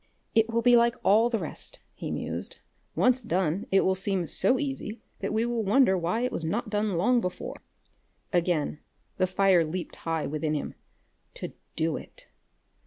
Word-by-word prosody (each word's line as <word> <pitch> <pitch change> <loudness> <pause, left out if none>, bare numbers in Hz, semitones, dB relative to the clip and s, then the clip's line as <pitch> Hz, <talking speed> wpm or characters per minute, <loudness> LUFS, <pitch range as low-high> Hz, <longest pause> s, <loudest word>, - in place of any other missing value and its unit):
"It 225 0 +3
will 230 0 0
be 245 0 +6
like 235 0 +4
all 220 +4 +5
the 230 - 0
rest," - - -6 0.2
he - - -6
mused. - - -4 0.4
"Once 255 0 +3
done, 190 -4 -1
it 195 - +5
will 190 - +2
seem 190 -1 0
so 255 +9 +3
easy 265 -5 -4 0.2
that - - -2
we 220 +2 +1
will 240 -2 -1
wonder 210 0 +4
why 180 +6 0
it 250 - 0
was - - -3
not 210 +7 -2
done 205 -3 0
long 240 +7 +3
before." 180 -3 -4 0.8
Again 170 -4 +1 0.4
the 185 - +2
fire 185 -2 +4
leaped 170 +3 -5
high 165 -2 -2
within 155 +1 -1
him. 145 - -3 0.6
To - - -6 0.2
do 160 -1 0
it! - - -12
195 Hz, 175 wpm, -27 LUFS, 175-235 Hz, 0.8 s, be